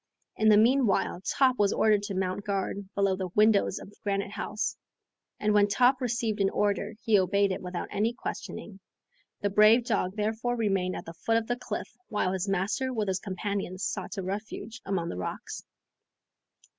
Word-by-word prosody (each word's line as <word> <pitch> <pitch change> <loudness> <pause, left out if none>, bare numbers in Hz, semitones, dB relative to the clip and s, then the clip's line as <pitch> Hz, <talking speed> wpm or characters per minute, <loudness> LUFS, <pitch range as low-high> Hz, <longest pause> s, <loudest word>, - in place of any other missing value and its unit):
In 220 - +3
the 210 - +7
meanwhile 230 -5 +3
Top 255 +5 +2
was 205 -1 +4
ordered 215 -2 +3
to 205 -1 -5
mount 185 +1 -1
guard 200 -1 -3
below 195 -1 +2
the 185 -1 -3
windows 210 -1 +4
of 205 - -10
Granite 200 -1 -1
House, 210 +1 -3 0.6
and 210 0 +1
when 205 -1 +5
Top 250 +6 +3
received 230 -3 -1
an 195 - +3
order 205 +1 0
he 220 -4 +4
obeyed 200 +1 +2
it 185 - -3
without 180 -1 -4
any 215 +3 +1
questioning. 220 -4 -7 0.6
The 205 - 0
brave 215 +4 +6
dog 200 -5 0
therefore 220 +3 -1
remained 195 -5 0
at - - -6
the 165 - -8
foot 225 +7 0
of 230 - -1
the 245 - -1
cliff 245 - -6
while 190 -3 0
his 190 +1 -2
master 200 +7 0
with 215 -5 -1
his 190 0 0
companions 195 -1 -4
sought 230 - -3
a 195 - -2
refuge 210 +4 -5
among 180 -4 -1
the - - -5
rocks. 90 - -5
205 Hz, 180 wpm, -28 LUFS, 195-220 Hz, 0.6 s, the